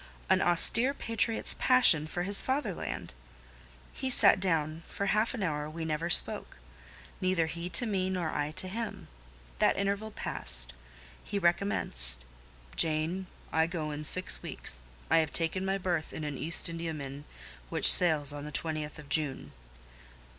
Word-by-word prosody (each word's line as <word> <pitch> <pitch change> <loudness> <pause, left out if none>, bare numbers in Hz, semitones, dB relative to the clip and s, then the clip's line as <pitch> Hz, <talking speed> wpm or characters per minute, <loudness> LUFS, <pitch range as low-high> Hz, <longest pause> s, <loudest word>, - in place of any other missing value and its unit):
An - - +3
austere 230 +10 +6
patriot's 230 -2 -2
passion 220 - +3
for 175 +2 -5
his 200 +2 +3
fatherland! 260 - -5 0.8
He 265 - -5
sat 230 -5 +5
down; 160 -4 -2
for 200 - -5
half 215 +5 0
an 220 - -5
hour 150 -3 -3
we 160 +1 -7
never 160 +2 -3
spoke; 170 - +3 0.6
neither 185 -3 0
he 170 +2 -7
to 240 - +3
me 190 -4 -2
nor 180 -4 -3
I 145 0 -3
to 185 +5 -3
him: 225 +4 -7 0.5
that - - +2
interval 200 +2 -3
past, 60 - -2 0.5
he 205 - -5
recommenced— 65 - +4 0.5
"Jane, 165 +4 0 0.3
I 160 0 +1
go 160 -3 -5
in 150 +1 -7
six 185 +4 -2
weeks; 60 0 -3 0.3
I - - +4
have 155 -2 -2
taken 170 +3 -2
my 195 0 -2
berth 175 -4 -4
in 160 - -7
an 150 -1 -5
East 165 +6 +2
Indiaman 155 -4 -7 0.4
which - - +7
sails 155 -5 +3
on 145 0 -8
the 150 - -8
20th 155 -1 -5
of 150 -2 -13
June." 140 - -2
165 Hz, 155 wpm, -29 LUFS, 150-195 Hz, 0.8 s, which